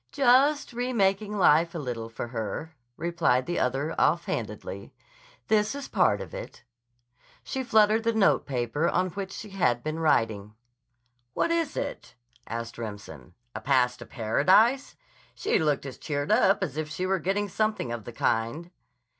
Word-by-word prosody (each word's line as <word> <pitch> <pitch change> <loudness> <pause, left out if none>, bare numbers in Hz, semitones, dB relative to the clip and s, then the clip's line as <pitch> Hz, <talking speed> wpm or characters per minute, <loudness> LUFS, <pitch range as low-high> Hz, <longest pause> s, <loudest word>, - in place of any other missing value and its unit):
"Just 275 +1 +3
remaking 210 -4 0
life 170 -2 +4
a - - -1
little 120 -6 -4
for 115 +1 -6
her," 115 +7 -5 0.2
replied 165 -7 +1
the 175 - -2
other 135 +5 -1
offhandedly. - - -2 0.5
"This 215 +3 +2
is 280 -1 -6
part - - +2
of - - -9
it." - - -8 0.8
She 265 - -3
fluttered 220 -2 +4
the 230 +1 +1
note 220 -3 +2
paper 130 +4 0
on 185 +1 0
which 195 +2 -5
she 210 0 -8
had 125 -11 +1
been 155 +1 -3
writing. 110 -9 +1 0.8
"What - - +1
is 330 -3 -1
it?" 285 - -5 0.3
asked 115 +1 -5
Remsen. 100 - -8 0.2
"A - - -6
pass 125 -2 +2
to - - -11
Paradise? 185 - +2 0.4
She 415 - +1
looked 150 -3 0
as 135 - -8
cheered 145 +1 -2
up 205 -3 +4
as 150 -6 -4
if 155 -1 -3
she 160 +4 -3
were 190 0 +1
getting 195 +5 -1
something 215 - -1
of 120 -3 -5
the - - -7
kind." 115 +10 -1
170 Hz, 155 wpm, -27 LUFS, -, 0.8 s, life